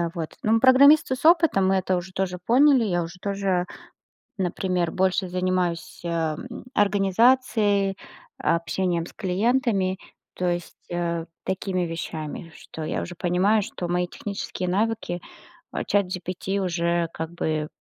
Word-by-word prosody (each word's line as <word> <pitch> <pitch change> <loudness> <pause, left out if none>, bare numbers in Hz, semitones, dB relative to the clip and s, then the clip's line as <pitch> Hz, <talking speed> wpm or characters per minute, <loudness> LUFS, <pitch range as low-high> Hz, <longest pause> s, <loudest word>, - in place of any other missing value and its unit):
вот. 165 -2 -3
Ну, 215 - +1
м, 225 - +4
программисты 265 +1 +6
с - - -9
опытом, 325 - +5
мы 195 - +3
это 185 -1 +1
уже 180 +1 -6
тоже 185 -1 -2
поняли. 255 +5 +4
Я 175 -4 0
уже 170 +2 -9
тоже, 195 -3 0 0.7
например, 180 -2 -1
больше 190 0 +1
занимаюсь, 180 -1 -1
э, 165 -2 -1 0.4
организацией, 205 0 +3 0.4
общением 170 0 0
с - - -11
клиентами, 195 -1 0 0.4
то 180 - -2
есть, 175 0 -4
э, 170 -1 -2 0.2
такими 190 -1 -2
вещами. 165 -1 -5
Что 160 - -9
я - - -2
уже 180 - -7
понимаю, 185 +5 +2
что 175 -2 -5
мои 180 0 0
технические 190 -1 -5
навыки, 200 -2 -1 0.5
а, - - -2
"Чат 200 -2 +2
GPT" 185 +2 -3
уже 170 -2 0
как 160 +1 -5
бы, 155 -3 -2
185 Hz, 140 wpm, -24 LUFS, 175-200 Hz, 0.7 s, программисты